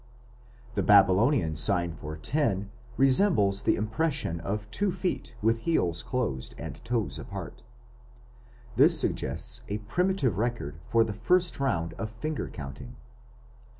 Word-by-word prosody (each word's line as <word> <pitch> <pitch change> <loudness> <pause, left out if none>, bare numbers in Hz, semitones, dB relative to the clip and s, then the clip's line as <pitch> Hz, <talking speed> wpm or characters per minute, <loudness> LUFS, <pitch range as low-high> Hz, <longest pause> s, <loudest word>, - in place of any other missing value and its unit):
The 100 - 0
Babylonian 100 - +4
sign 85 0 +1
for 80 -1 -7
10 100 - -1 0.3
resembles 130 - +4
the - - +2
impression 110 - -1
of 105 +5 -3
two 200 -1 0
feet 180 -9 -3
with 115 +1 +3
heels 90 - 0
closed 115 - -3
and - - -8
toes 110 - -2
apart. 70 - -7 1.2
This - - +5
suggests - - -2
a 105 - -2
primitive 130 - 0
record 110 -11 -2
of 115 -1 +5
the 110 - -4
first 175 - +1
round 85 -12 0
of 110 - -3
finger 140 +8 -4
counting. 75 - -8
110 Hz, 125 wpm, -28 LUFS, 90-135 Hz, 1.2 s, This